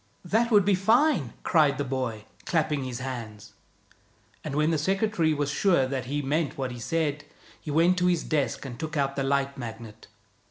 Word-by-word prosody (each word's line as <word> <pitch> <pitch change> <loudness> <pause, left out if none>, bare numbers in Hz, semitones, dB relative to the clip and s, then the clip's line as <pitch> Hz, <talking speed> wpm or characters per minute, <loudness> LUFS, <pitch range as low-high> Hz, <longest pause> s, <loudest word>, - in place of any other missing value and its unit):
"That 225 +6 +2
would 205 -5 +5
be 205 - +4
fine!" 195 - +2
cried 150 -4 +3
the 145 - -1
boy, 125 -5 -3 0.2
clapping 155 -5 0
his 125 -1 -5
hands; 115 -5 -7 0.9
and 145 -2 -4
when 150 +2 +2
the 160 - +1
secretary 195 -1 +1
was 145 -1 -1
sure 170 -6 +3
that 130 -1 -3
he 145 +3 -2
meant 150 +2 -1
what 130 -2 -3
he 120 - -7
said, 150 +1 -1 0.4
he - - -9
went 170 +5 +3
to 180 - +2
his 175 -3 +1
desk 145 -2 -1
and 125 -3 -7
took 155 -1 -4
out 140 -1 0
the 140 - -1
Light 140 0 0
Magnet. 115 -2 -8
145 Hz, 190 wpm, -27 LUFS, 130-165 Hz, 0.9 s, would